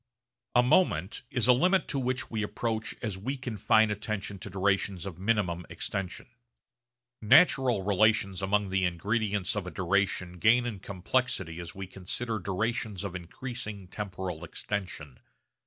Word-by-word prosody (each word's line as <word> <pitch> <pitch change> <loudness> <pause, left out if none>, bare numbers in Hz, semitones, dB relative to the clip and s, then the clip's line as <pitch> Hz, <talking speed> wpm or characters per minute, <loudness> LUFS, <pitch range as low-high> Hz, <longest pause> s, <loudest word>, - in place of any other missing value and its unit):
A 125 - +7
moment 110 - +2
is 120 -2 +1
a 125 - +8
limit 180 +8 +3
to 140 - 0
which 130 0 -1
we 110 -2 -1
approach 110 +1 -2
as 105 -5 -3
we 135 +8 -3
confine 110 -3 +2
attention 105 -1 -3
to 105 - -7
durations 95 -1 0
of 90 -3 -7
minimum 95 -4 0
extension. 95 -2 -4 1.0
Natural 125 - +5
relations 100 -1 +2
among 100 0 +1
the 95 0 +1
ingredients 100 +2 0
of 100 -3 -3
a - - -2
duration 95 -1 0
gain 120 +6 +5
in 110 -5 -4
complexity 90 -3 -1
as 85 -1 -8
we 95 0 -5
consider 105 +5 -3
durations 105 +1 -2
of 100 -3 -4
increasing 105 +2 -6
temporal 95 -5 -5
extension. 85 -6 -5
100 Hz, 140 wpm, -29 LUFS, 95-115 Hz, 1.0 s, a